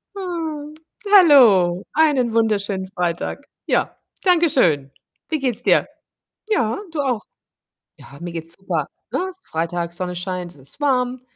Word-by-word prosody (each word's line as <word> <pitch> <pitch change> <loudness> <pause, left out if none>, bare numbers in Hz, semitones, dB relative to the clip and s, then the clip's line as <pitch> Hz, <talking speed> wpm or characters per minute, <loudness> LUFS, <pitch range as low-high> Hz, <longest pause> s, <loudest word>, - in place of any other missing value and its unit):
Ah. 335 -6 -4 0.5
Hallo, 230 - +6
einen 285 -7 +3
wunderschönen 205 -4 0
Freitag. 180 +8 -3 0.2
Ja, - - 0 0.3
danke 345 -3 +4
schön. 150 - +2 0.4
Wie 315 - 0
geht's 255 -5 -1
dir? - - +3 0.6
Ja, 235 - +1
du 320 - -4
auch. 250 -6 -1 0.8
Ja, 140 - -14
mir 175 0 -6
geht's 165 0 -6
super, 195 - -2 0.2
ne? 375 - -1
Freitag, 170 +1 -3
Sonne 180 0 -4
scheint, 180 -1 -4
es 145 - -19
ist 135 - -14
warm 255 -3 +1
220 Hz, 130 wpm, -21 LUFS, 175-290 Hz, 0.8 s, Hallo